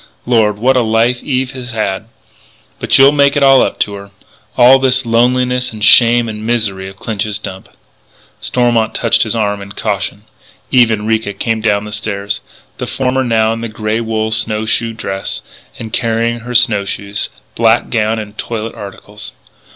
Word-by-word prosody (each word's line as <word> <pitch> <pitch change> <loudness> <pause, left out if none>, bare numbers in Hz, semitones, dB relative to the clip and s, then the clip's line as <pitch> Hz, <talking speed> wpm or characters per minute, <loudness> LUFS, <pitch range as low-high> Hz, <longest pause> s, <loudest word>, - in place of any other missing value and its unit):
Lord! 110 -4 +2
what 130 +5 +2
a 125 - +3
life 115 +2 +1
Eve 130 -2 -2
has 130 -2 -8
had! 105 -2 -2 0.7
But - - +2
you'll 135 +1 +7
make 140 -1 +3
it 140 - +2
all 135 -1 +6
up - - -1
to 105 - 0
her... 100 0 -9 0.5
all 130 +2 +7
this 130 -1 +1
loneliness 125 +2 +1
and 110 -1 -3
shame 120 +1 +6
and 105 -1 -6
misery 105 -5 -1
of 95 - -13
Clinch's 105 0 -3
Dump 95 -3 -8 0.4
" - - -32
Stormont 120 -3 0
touched 115 - +2
his 110 0 0
arm 105 -2 -1
in 100 0 -10
caution: 100 -1 -3 0.5
Eve 120 -2 +5
and 105 -1 -2
Ricca 110 -2 0
came 110 +3 -2
down 105 -2 +1
the 105 - -8
stairs 100 -1 -3 0.4
the - - -4
former 130 0 -1
now 110 -2 +1
in 115 - -6
the 115 - -4
grey 110 +1 -2
wool 110 -1 -2
snow 110 0 0
shoe 115 +1 -1
dress, 95 -3 -4 0.4
and 110 -1 -7
carrying 115 0 0
her 120 +1 -7
snow 110 -4 +4
shoes, 100 +1 -4 0.2
black 115 +1 +2
gown, 110 -1 0
and 105 -1 -7
toilet 115 -1 -4
articles. 105 +1 -10
110 Hz, 180 wpm, -14 LUFS, 105-120 Hz, 0.7 s, you'll